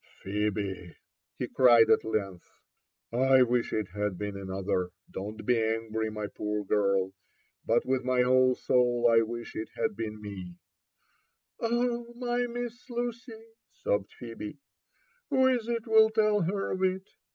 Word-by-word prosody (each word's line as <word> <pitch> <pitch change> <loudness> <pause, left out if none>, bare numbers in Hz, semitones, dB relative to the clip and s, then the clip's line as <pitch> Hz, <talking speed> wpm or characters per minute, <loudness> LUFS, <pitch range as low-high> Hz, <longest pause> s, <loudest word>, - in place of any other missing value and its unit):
''Phebe!" 100 -3 -2 0.4
he - - -2
cried 120 -3 +6
at - - +4
length, 100 -5 -3 0.6
I 130 +2 +5
wish 120 -1 0
it 110 -3 -2
had 105 -2 -2
been 105 +1 -4
anpther: 95 -2 -2 0.2
don't 105 +3 -6
be 120 -2 +3
angry, 110 0 -1
my 105 -1 -4
poor 105 0 -3
girl 100 -2 +1 0.5
but 115 - +2
with 130 0 0
my 125 0 +2
whole 130 0 +4
soul 125 -2 +2
I 115 -1 +5
wish 120 +1 -5
it 110 - -4
had - - -1
been 110 -1 -5
me 95 -4 -8 1.1
I" 230 - +1
*' - - -5
Oh, 240 0 -1
my 245 0 -1
Miss 240 +1 -6
Lucy!" 240 -1 -5 0.2
sobbed 100 -1 -2
Phebe, 115 +1 -8 0.7
who 260 -3 +3
is 250 -3 +2
it 230 -2 -2
will 220 -1 +6
tell 215 -1 +2
her 195 +4 -1
of 185 - -3
it 190 +1 0
120 Hz, 150 wpm, -29 LUFS, -, 1.1 s, cried